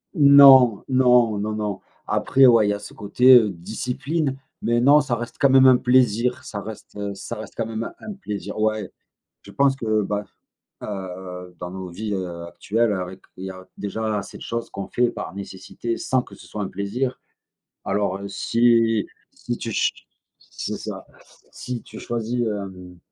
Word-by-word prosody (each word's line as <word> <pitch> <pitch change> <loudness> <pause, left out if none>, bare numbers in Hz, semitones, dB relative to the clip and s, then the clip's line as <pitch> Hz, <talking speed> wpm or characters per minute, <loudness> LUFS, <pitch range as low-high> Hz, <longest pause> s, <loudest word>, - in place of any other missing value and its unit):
Non, 140 - +8
non, 125 -4 +4
non, 105 +2 -2
non, 105 -3 -3 0.3
après 135 0 +4
ouais, 115 -3 +5
il - - +1
y - - +1
a 105 - -4
ce - - -11
côté, 125 +5 +5
heu, 110 -4 +6
discipline, 135 - -3 0.3
mais 120 +1 +2
non, 145 +3 +6
ça 125 -4 -1
reste 120 +1 -6
quand 140 -1 +4
même 130 0 +7
un 130 -1 +7
plaisir, 125 -1 +2
ça 100 -2 -6
reste, 110 -1 -10
heu, 100 -1 -4
ça 115 +4 -7
reste 110 -1 -9
quand 115 -1 -2
même 115 +1 -5
un 215 - -7
plaisir, 105 - -6
ouais, 110 -2 0 0.5
je - - -13
pense 140 -1 +2
que, 110 -3 0
bah, 105 +1 -2 0.6
heu, 90 -2 -7
dans 90 - -6
nos 95 -1 -7
vies, 105 +4 -5
heu, 85 -3 -5
actuelles 110 +5 0
avec 95 0 -5 0.2
il 95 - -7
y - - -5
a 95 0 -11
déjà 110 +1 -2
assez - - -8
de - - -11
choses 115 0 -4
qu'on 100 - -6
fait 120 -1 +1
par - - -7
nécessité 100 +4 -5
sans 130 -1 0
que - - -14
ce - - -15
soit 105 - -5
un 95 - -3
plaisir 110 +7 -3 0.7
alors, 100 -2 -1
heu, 100 - -6
si 115 +1 +2 0.3
si - - -5
tu - - -4
ch - - +1 0.5
c'est - - -6
ça, - - -7 0.5
si 125 -2 -6
tu - - -11
choisis, 120 +1 -3
hem, 95 -4 -6
110 Hz, 185 wpm, -23 LUFS, 100-125 Hz, 0.7 s, Non